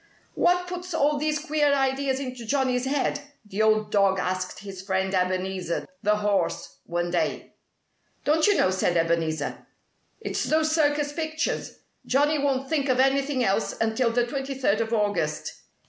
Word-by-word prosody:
"What 360 0 +2
puts 360 -1 -5
all 295 -1 +2
these 305 0 0
queer 300 -1 +1
ideas 270 0 0
into 255 -3 -6
Johnnie's 255 0 0
head?" 280 +1 0 0.2
the 210 +1 -3
old 215 0 +2
dog 195 -2 +3
asked 185 0 -3
his 195 -2 -8
friend 190 0 -1
Ebenezer, 185 -1 -1
the 210 +1 +3
horse, 205 -4 -1
one 175 0 -2
day. 165 -3 -2 0.7
"Don't 310 +3 +3
you 410 - +4
know?" 185 - +3
said 180 -2 +1
Ebenezer. 165 -2 -1 0.5
"It's - - -2
those 315 0 +2
circus 290 -2 +1
pictures. 315 0 -3 0.3
Johnnie 290 +3 +2
won't 270 -1 0
think 280 -2 0
of 255 0 +2
anything 270 0 +2
else 195 0 0
until 225 +2 +1
the 240 +1 +1
twenty 270 +2 -4
third 230 -5 +1
of 225 0 -2
August." 205 -9 -1
250 Hz, 155 wpm, -25 LUFS, 190-290 Hz, 0.7 s, you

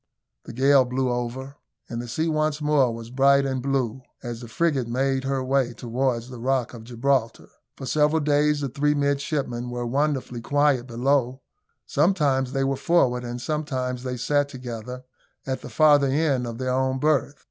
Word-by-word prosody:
The - - -8
gale 135 +2 +5
blew 125 0 -1
over, 125 +3 -4 0.3
and 120 -1 -4
the 120 - -7
sea 155 +7 -1
once 155 -1 0
more 150 -4 +2
was 115 0 -8
bright 140 +1 +4
and 130 -1 -2
blue, 130 -2 -1 0.2
as 120 -1 -6
the 120 - -8
frigate 140 -1 0
made 135 +2 0
her 135 -1 -1
way 130 -2 +1
towards 120 0 -2
the 125 -2 -9
Rock 130 0 0
of 115 -2 -10
Gibraltar. 125 0 -1 0.3
For 135 - -7
several 150 +3 +2
days 150 0 +2
the 140 - -2
three 150 +3 +1
midshipmen 140 -3 -1
were 120 0 -4
wonderfully 135 -2 -1
quiet 140 -1 +2
below; 130 +1 0 0.4
sometimes 145 -5 +1
they 135 0 0
were 135 0 0
forward, 125 -8 +2
and 120 0 -5
sometimes 130 -4 -3
they 125 0 -4
sat 145 +3 +1
together 125 -1 -7 0.4
at 130 -1 -3
the - - -8
farther 145 +3 +5
end 135 -3 +1
of 115 -1 -6
their 130 0 -2
own 130 0 +1
berth. 145 -1 +1
130 Hz, 175 wpm, -24 LUFS, 125-145 Hz, 0.4 s, gale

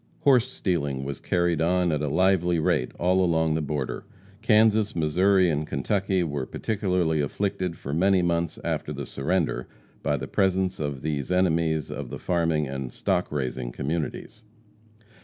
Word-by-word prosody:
Horse 130 -3 +4
stealing 75 - -2
was 70 0 -5
carried 85 -2 0
on 90 +1 +2
at 75 -1 0
a 75 - -1
lively 90 +2 +2
rate 70 -5 +1
all 90 +2 +2
along 80 -2 +2
the 80 - 0
border. 75 -2 -3 0.4
Kansas, 110 -1 +3
Missouri 90 +4 +3
and 75 -2 -1
Kentucky 95 +5 0
were 70 -5 -3
particularly 90 -7 0
afflicted 90 +2 -2
for 70 - -6
many 95 +3 +3
months 85 -1 0
after 75 - -2
the 70 -1 -5
surrender 80 +6 -1 0.3
by - - 0
the - - -5
presence 95 -1 +1
of 70 -3 -4
these 75 -1 -2
enemies 80 -4 +1
of 70 -4 -5
the - - -6
farming 80 -4 0
and 65 -2 -5
stock - - -1
raising 65 -4 -3
communities. 80 - -4
85 Hz, 155 wpm, -26 LUFS, 75-95 Hz, 0.4 s, Horse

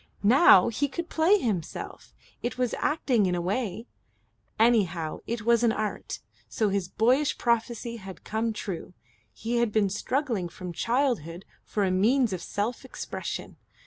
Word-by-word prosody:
Now 235 - +7
he 275 +5 0
could 340 +5 -5
play 335 +6 +4
himself. 195 - -4 0.3
It 240 - -3
was 250 -2 0
acting 255 -9 +2
in 180 - 0
a - - -1
way. 205 +4 -2 0.7
Anyhow 185 -9 +2
it 230 -1 -3
was 235 0 +4
an 235 -2 +4
Art; 215 -1 -4 0.3
so 215 -3 0
his 195 -2 -1
boyish 255 +9 +2
prophecy 235 0 -1
had 195 -3 -10
come 225 +1 -1
true. 190 -4 -6 0.4
He 230 - -3
had 235 -2 +2
been 205 -3 +2
struggling 225 - -1
from 180 0 -7
childhood 230 - -1 0.2
for 210 - -1
a 190 - +1
means 225 +4 +3
of 180 - -4
self 215 +4 -3
expression. - - -6
225 Hz, 150 wpm, -27 LUFS, 190-245 Hz, 0.7 s, Now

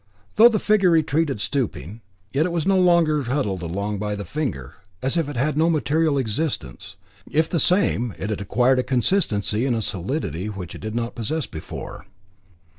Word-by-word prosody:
Though 230 +3 +8
the 225 - +1
figure 210 -3 +3
retreated 155 -5 +1
stooping, 110 - -3 0.3
yet 150 +5 +2
it - - -4
was 170 -2 -1
no 195 -1 +3
longer 170 -4 +4
huddled 120 -8 -2
along 100 +4 -3
by 105 0 -2
the 100 -1 -6
finger, 100 - -4 0.2
as 130 +4 0
if 165 -4 0
it 145 - -6
had 145 +4 0
no 160 +2 +3
material 155 -1 +1
existence. 100 - -3 0.3
If 160 +1 +2
the 170 - -1
same, 140 - +2
it 105 +3 -4
had 105 - -3
acquired 125 +6 +2
a - - +1
consistency 120 - +1
and 130 -3 +1
a 115 - -1
solidity 95 - -3
which 95 -5 -7
it - - -10
did 110 +1 -5
not 120 0 -2
possess 135 +7 -2
before. 80 - -8
130 Hz, 185 wpm, -23 LUFS, 105-160 Hz, 0.3 s, Though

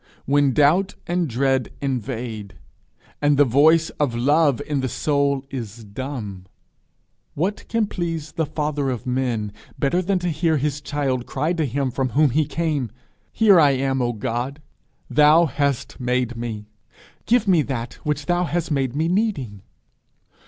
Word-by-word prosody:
When 140 0 +3
doubt 160 +9 +3
and 175 -1 0
dread 130 0 0
invade, 120 -6 -4 0.7
and 145 -1 +3
the 145 - +6
voice 155 +6 +4
of 140 -6 +1
love 145 +2 +3
in 145 -2 -1
the 130 -1 -1
soul 140 -1 0
is 115 -4 -6
dumb, 105 -4 -6 0.9
what 190 +7 -2
can 230 -1 +1
please 165 -5 -4
the 160 -2 -2
father 150 -2 -1
of 125 -2 -4
men 125 -5 -1 0.3
better 145 +6 +1
than 190 +1 0
to 175 0 -1
hear 160 0 +1
his 145 +1 -2
child 135 -5 -2
cry 150 +6 -1
to 160 -4 0
him 135 +1 -1
from 130 +1 -1
whom 150 -3 +5
he 155 +4 +2
came, 150 -5 -1 0.4
'Here 205 -5 +5
I 145 -3 +5
am, 135 0 0
O 120 -1 +1
God! 120 +5 -3 0.5
Thou 150 +3 +5
hast 140 -2 -2
made 125 -1 0
me: 115 -3 -5 0.6
give 230 -2 +3
me 180 -5 +5
that 130 -4 -4
which 150 -1 -2
thou 175 0 +1
hast 165 +1 -2
made 135 -3 0
me 160 +2 +1
needing.' 170 - -1
140 Hz, 155 wpm, -22 LUFS, 125-160 Hz, 0.9 s, the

